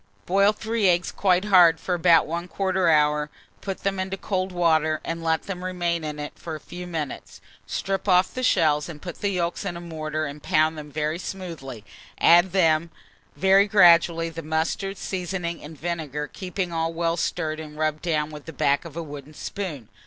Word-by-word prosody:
Boil 200 +3 +4
3 215 -1 0
eggs 175 0 +1
quite 185 0 +2
hard 175 -5 +6
for 180 - -2
about 170 -2 +5
1/4 180 +2 0
hour, 150 -1 +2 0.3
put 195 -1 -5
them 195 -1 -1
into 190 +1 -3
cold 190 -1 -2
water, 160 -3 +2
and 165 0 -3
let 160 -1 +1
them 180 -2 -6
remain 175 -2 -1
in 150 -1 -4
it 150 0 -6
for 165 -2 -6
a - - -7
few 180 +3 -9
minutes; 160 -5 -5 0.3
strip 195 +1 -2
off 180 0 +4
the 255 - -4
shells, 160 -10 +2
put 175 +1 -8
the 200 - +1
yolks 175 -3 -2
in 175 - -4
a - - -6
mortar, 155 -2 -4
and 145 +1 -7
pound 155 +2 +2
them 150 -1 -9
very 155 +2 -2
smoothly; 165 - -7 0.3
add 175 +1 +7
to - - -11
them, 165 -3 +2 0.5
very 195 +1 +4
gradually, 170 -4 +5
the 165 0 -7
mustard, 160 +5 -2
seasoning, 180 -2 -4
and 150 0 -10
vinegar, 155 -4 -3
keeping 180 +1 -4
all 165 0 0
well 165 0 0
stirred 160 -2 -2
and 150 -1 -9
rubbed 155 0 -1
down 155 -3 -1
with 150 -1 -10
the 165 - -7
back 140 +3 +1
of 165 -1 -9
a 170 - -3
wooden 145 0 -10
spoon. 155 - -5
170 Hz, 190 wpm, -24 LUFS, 155-185 Hz, 0.5 s, add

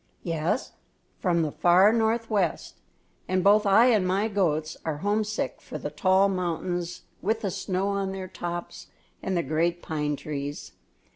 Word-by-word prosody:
"Yes, 170 +7 -1 0.5
from 170 -3 +2
the 155 - -2
far 185 +7 +5
northwest; 220 -5 0 0.5
and 185 0 +1
both 210 +1 +5
I 200 +4 +6
and 205 -5 +2
my 195 +4 +1
goats 160 -6 0
are 160 -2 -2
homesick 215 +1 -1
for - - -7
the - - -5
tall 190 0 +3
mountains 175 -1 -3 0.2
with 220 +4 0
the 195 - -1
snow 190 0 -1
on 200 -1 -1
their 190 -1 -5
tops 175 -1 -6 0.3
and 190 -2 -1
the 170 - +1
great 170 +4 0
pine 150 -2 -1
trees. 145 0 -6
185 Hz, 150 wpm, -26 LUFS, 170-200 Hz, 0.5 s, I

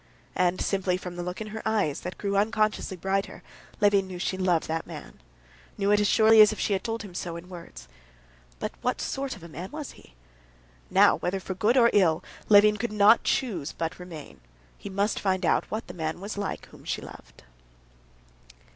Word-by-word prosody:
And 180 0 +1
simply 190 -2 0
from 180 -1 -8
the 175 - -4
look 180 +3 -5
in 215 - -4
her 220 - -5
eyes, 205 -10 0
that 180 - -6
grew 200 -1 -2
unconsciously 215 -2 0
brighter, 195 +3 -2 0.4
Levin 205 -2 +3
knew 185 - -7
that 175 - -4
she - - -1
loved 180 -3 +1
that 160 +1 -3
man, - - -10 0.6
knew 200 +1 +1
it 210 - +5
as 205 - +2
surely 220 +1 +6
as 210 - +7
if 215 - -6
she 205 - 0
had 190 - -1
told 225 -1 -3
him 195 -4 -10
so 175 -1 -4
in 170 +2 -9
words. 170 - -11 0.7
But - - -4
what - - -1
sort 270 -1 -3
of 185 - -14
a - - -8
man 170 +3 -7
was 300 -2 -7
he? - - -19 0.7
Now, - - +5
whether 185 +2 -2
for 190 - -5
good 215 +7 +2
or 235 -2 +6
for - - -4
ill, 170 -5 +3 0.3
Levin 210 0 +7
could 235 +1 -3
not 210 +2 +5
choose 180 - -1
but 165 +2 -4
remain; 155 - -10 0.3
he - - -9
must 200 +2 0
find 190 -2 0
out - - +1
what 220 +2 -4
the - - -9
man 160 0 -3
was 200 +3 -6
like 200 -1 -4
whom - - -16
she - - -3
loved. - - -13
195 Hz, 210 wpm, -27 LUFS, 180-210 Hz, 0.7 s, as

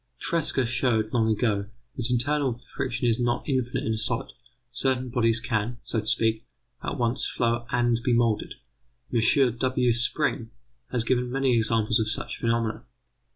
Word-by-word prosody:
Tresca 155 -3 +1
showed 115 -3 0
long 115 -2 +2
ago 105 -3 0 0.3
that 120 -1 0
internal 130 0 0 0.2
friction 125 -2 -1
is 115 0 +2
not 120 0 -1
infinite 130 -4 -1
in 110 - 0
a - - -2
solid; 115 +2 -1 0.4
certain 130 0 -1
bodies 115 -1 +2
can, 115 -1 -2
so 115 - -2
to 110 - -6
speak, 110 0 +1 0.4
at - - -3
once 120 -1 0
flow 120 0 -1
and 120 -3 +2
be 125 - +1
moulded. 115 -2 +1 0.6
M.W. 125 +1 +2
Spring 120 0 0 0.4
has 120 -3 +1
given 125 +1 0
many 135 -1 +2
examples 110 0 +2
of 110 -1 +1
such - - -1
phenomena. 115 -1 -1
120 Hz, 155 wpm, -26 LUFS, 115-125 Hz, 0.6 s, long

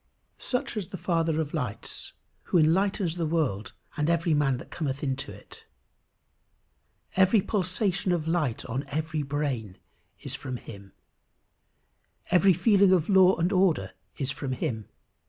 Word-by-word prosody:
Such 250 -2 -2
is 205 -5 -3
the 190 - -7
Father 165 -3 0
of 155 -2 -3
lights 125 -10 -5 0.3
who - - +2
enlightens 175 +2 +2
the 170 - 0
world 150 -11 -1 0.2
and 150 +1 0
every 170 -1 +2
man 140 -3 +2
that - - -11
cometh 145 -3 -3
into 135 -1 -3
it. - - -13 1.5
Every 190 +3 +5
pulsation 190 0 0
of 165 -3 -1
light 160 -8 0
on 125 +3 -3
every 155 +2 -2
brain 135 -9 -3 0.4
is - - -5
from 130 -1 -5
him. 100 -4 -12 1.4
Every 190 +2 +6
feeling 195 +2 +4
of 180 -2 +3
law 190 -1 +6
and 170 +3 0
order 180 - +2 0.3
is 135 -1 -2
from 135 -3 -4
him. 120 -6 -3
160 Hz, 140 wpm, -27 LUFS, 135-185 Hz, 1.5 s, Every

